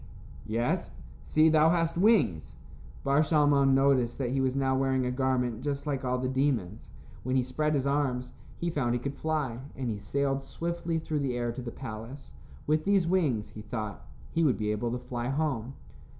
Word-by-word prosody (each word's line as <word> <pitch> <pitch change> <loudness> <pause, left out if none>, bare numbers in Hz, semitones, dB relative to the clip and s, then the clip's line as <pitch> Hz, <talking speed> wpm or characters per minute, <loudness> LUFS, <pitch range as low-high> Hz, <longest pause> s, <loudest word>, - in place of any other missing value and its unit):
"Yes; 115 +3 0 0.3
see 155 - +4
thou 155 0 +5
hast 165 -1 +1
wings." 170 - +2 0.5
Bar 140 +2 +3
Shalmon 145 -3 +4
noticed 135 -3 +3
that 125 -3 -1
he 135 0 +1
was 130 0 +1
now 135 -1 +1
wearing 130 -1 +1
a 125 - 0
garment 125 -3 0
just 140 +1 -3
like 140 -3 -2
all 125 0 0
the 130 0 -1
demons. 130 -7 -1 0.3
When 130 +1 -1
he 130 - +3
spread 150 +4 0
his 135 -1 0
arms, 135 -3 0 0.2
he 170 0 -2
found 125 -6 0
he - - 0
could 140 +3 -4
fly, 150 -6 -2 0.2
and 125 -3 -2
he 105 - -4
sailed 135 +6 -1
swiftly 170 +3 -3
through 155 -1 -2
the 130 -3 -1
air 120 -1 -1
to 125 +2 -6
the 120 - -5
palace. 115 +4 -8 0.3
With 155 +1 +2
these 195 -3 +3
wings, 155 - +1
he 110 - -9
thought, 110 -1 -5 0.3
he 165 - +1
would 140 -6 +3
be 105 -1 -1
able 110 +3 -1
to 125 - -1
fly 120 -1 -4
home. 135 -4 -1
135 Hz, 195 wpm, -29 LUFS, 120-150 Hz, 0.5 s, thou